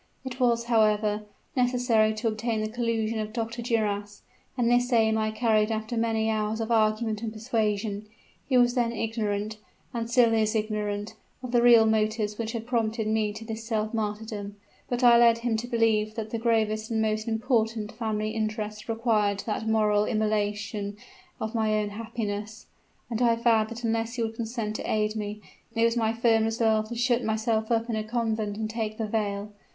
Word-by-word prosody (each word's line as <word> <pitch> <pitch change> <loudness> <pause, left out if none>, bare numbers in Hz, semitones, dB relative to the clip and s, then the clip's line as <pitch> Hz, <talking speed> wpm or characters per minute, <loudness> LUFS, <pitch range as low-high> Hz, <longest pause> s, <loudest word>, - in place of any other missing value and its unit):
It 260 0 -6
was, 235 -2 +3
however, 215 -2 +2 0.3
necessary 245 -4 +2
to 220 +2 -2
obtain 220 0 -1
the 215 - -2
collusion 230 -1 -1
of 215 0 -3
Dr. 230 0 -3
Duras; 205 -3 -1 0.3
and 240 -2 +2
this 245 +1 +3
aim 220 -2 +4
I 215 0 +1
carried 215 -1 +2
after 220 +2 -3
many 225 -1 +1
hours 215 0 -1
of 225 +1 -3
argument 215 -1 +1
and 225 -2 -3
persuasion. 215 -2 -2 0.4
He 260 - +4
was 245 0 +4
then 240 -2 +1
ignorant 215 -2 -2 0.3
and 230 -1 -3
still 240 -2 +4
is 220 0 +1
ignorant 210 -1 -2 0.3
of 250 - -5
the 240 -1 +4
real 235 -2 +7
motives 215 -1 0
which 225 0 -3
had 230 -1 -4
prompted 225 -2 0
me 215 -1 +1
to 220 +2 -8
this 225 0 -5
self 220 -1 -2
martyrdom; 210 -1 -4 0.3
but 245 0 -1
I 235 -1 +7
led 235 -1 +6
him 230 -1 -1
to 235 +2 -4
believe 220 -3 +1
that 220 -1 -5
the 230 - -2
gravest 220 -2 +1
and 225 -1 0
most 215 0 0
important 225 -2 0
family 215 -2 -2
interests 215 -1 -3
required 215 -3 +1
that 220 0 -2
moral 210 -1 +3
immolation 210 -1 -1 0.4
of 220 +1 -3
my 220 -2 +1
own 210 -1 -1
happiness; 215 -1 -5 0.5
and 230 +1 -1
I 235 -1 +4
vowed 230 -2 +2
that 235 +1 -8
unless 230 +1 -1
he 235 - -1
would 225 0 -2
consent 225 -1 -3
to - - -4
aid 215 0 +1
me, 210 0 -4 0.3
it 230 - +2
was 230 0 +2
my 225 -2 +1
firm 225 -1 +3
resolve 220 -1 +1
to 235 - -5
shut 240 +1 +1
myself 220 0 0
up 230 0 +1
in 230 - -2
a 215 - -1
convent 220 -2 -2
and 220 0 -2
take 215 -1 -3
the 225 - -1
veil. 210 -1 -2
220 Hz, 185 wpm, -27 LUFS, 215-230 Hz, 0.5 s, real